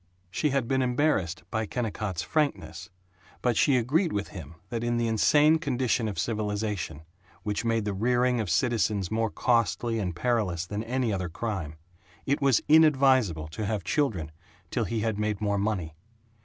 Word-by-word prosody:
She 150 - 0
had 135 -4 0
been 130 +1 +1
embarrassed 125 - 0
by 110 -1 -1
Kennicott's 105 -8 -3
frankness, 90 - -2 0.5
but 125 -2 +2
she 135 +2 +4
agreed 155 - +1
with 100 0 -2
him 90 -3 -9
that 115 -1 -3
in 120 0 0
the 120 0 +1
insane 150 +8 +4
condition 125 -5 0
of 105 - -4
civilization, 105 -7 -2 0.4
which 105 +1 -2
made 115 -2 0
the 105 - -1
rearing 125 +4 +1
of 105 - -4
citizens 105 -2 +1
more 110 0 0
costly 115 0 +1
and 90 -5 -3
perilous 100 -7 0
than 105 +4 -4
any 125 -2 0
other 90 -2 -2
crime, 85 -5 -4 0.5
it 140 +2 0
was 135 -4 +3
inadvisable 135 - +4
to 100 +7 -4
have 105 -2 -2
children 95 - -1 0.4
till 120 - 0
he 115 0 -2
had 110 -2 -1
made 105 -1 -1
more 100 -1 0
money. 95 -7 -2
110 Hz, 165 wpm, -27 LUFS, 100-125 Hz, 0.5 s, she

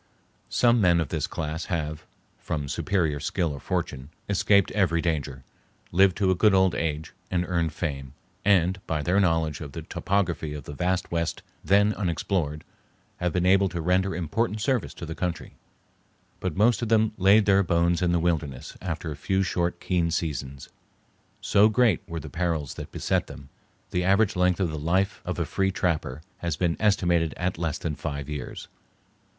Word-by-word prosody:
Some 120 -1 +3
men 85 -3 +4
of 80 - -1
this 80 -3 -1
class 80 +1 -4
have, 80 -3 -3 0.3
from 75 -3 -3
superior 80 -2 0
skill 80 +2 -1
or 70 - -7
fortune, 65 +1 -3 0.2
escaped 100 0 +3
every 95 -5 +2
danger, 75 -6 -2 0.5
lived 95 +1 +4
to 95 -3 +2
a - - +2
good 105 +2 +4
old 95 -1 +4
age, 80 0 -3 0.2
and 90 -1 0
earned 85 -3 0
fame, 70 -5 -4 0.3
and, 95 -1 +3
by 75 -3 -1
their 90 +5 +2
knowledge 80 -5 +1
of 70 -3 -7
the - - -6
topography 85 -6 -1
of 75 - -7
the 75 - -8
vast 90 +4 -1
West 85 -1 -2 0.2
then 100 +2 +4
unexplored, 85 -5 -2 0.5
have 90 -1 -1
been 90 +1 0
able 95 +1 +4
to 85 - -4
render 90 +2 +1
important 105 +6 -1
service 125 +2 -1
to - - -7
the 80 - -5
country; 85 -1 -4 0.9
but 95 -2 -3
most 115 +4 +4
of 115 - -2
them 110 -1 +3
laid 100 +3 +5
their 100 -1 +5
bones 85 -1 +1
in 90 -1 +2
the 85 - +3
wilderness 80 -6 -2
after 85 -3 -4
a - - -4
few 95 +7 0
short, 85 -1 -1
keen 85 -3 0
seasons. 70 -5 -3 0.7
So 105 +2 +4
great 110 -5 +3
were 85 -1 -4
the 75 - -8
perils 80 -2 -2
that - - -8
beset - - 0
them, 70 -1 -11 0.4
the 90 - 0
average 100 +3 +3
length 90 0 +2
of 90 -4 0
the 75 - -4
life 95 +5 0
of - - -3
a - - 0
"free 95 0 0
trapper" 80 -6 -2 0.2
has 85 -3 -2
been 85 -2 +1
estimated 85 -6 +2
at 90 -1 -2
less 80 -3 -1
than 80 - -3
five 70 -2 -5
years. 75 -4 -6
85 Hz, 180 wpm, -26 LUFS, 80-95 Hz, 0.9 s, laid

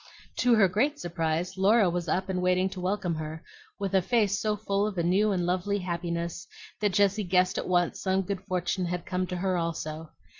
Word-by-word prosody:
To 245 -1 +4
her 205 -3 +5
great 260 - +1
surprise, 170 +1 -2
Laura 205 +1 +5
was 175 0 -2
up 185 +4 0
and 185 -1 -1
waiting 185 +1 +2
to 190 -1 -8
welcome 185 -2 -1
her, 155 0 -6 0.3
with 195 -1 -3
a 190 - +4
face 210 -1 +1
so 215 -1 0
full 205 -1 0
of 205 -3 -5
a 170 - +1
new 195 +5 +3
and 180 -3 0
lovely 185 +3 0
happiness 170 -1 -3 0.3
that 210 -3 +1
Jessie 205 +1 +3
guessed 180 0 +2
at - - -4
once 175 -2 +1
some 190 0 +1
good 190 0 -4
fortune 185 -1 -1
had 175 0 -3
come 185 -1 -2
to 180 - -4
her 185 0 0
also. 160 -2 -4
185 Hz, 210 wpm, -28 LUFS, 175-200 Hz, 0.3 s, her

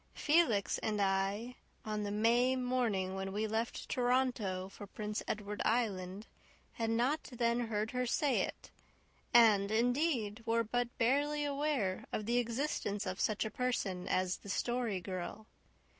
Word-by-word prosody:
Felix 295 - +2
and 210 -1 -1
I, 200 +5 0 0.3
on 215 -1 -2
the 205 - -2
May 235 +5 +3
morning 245 -7 0
when 190 0 -3
we 210 +2 -1
left 220 +2 -2
Toronto 245 -7 0
for 200 +1 -10
Prince 210 +1 -4
Edward 210 -1 -3
Island, 205 -4 0 0.5
had 225 -1 -2
not 245 +7 +1
then 235 0 0
heard 215 0 -1
her 250 0 -1
say 280 +3 +2
it, - - -5 0.6
and, 215 -4 +6
indeed, 235 -1 +1
were 230 +1 +2
but 245 +2 -2
barely 290 +5 +2
aware 280 -9 -1
of 215 - -2
the 240 +2 +2
existence 230 -4 -2
of 185 0 -4
such 215 0 +1
a 220 - -3
person 200 -7 -1
as 185 0 +1
the 200 - -12
Story 235 -2 -1
Girl. 185 +4 -5
225 Hz, 145 wpm, -34 LUFS, 200-245 Hz, 0.6 s, and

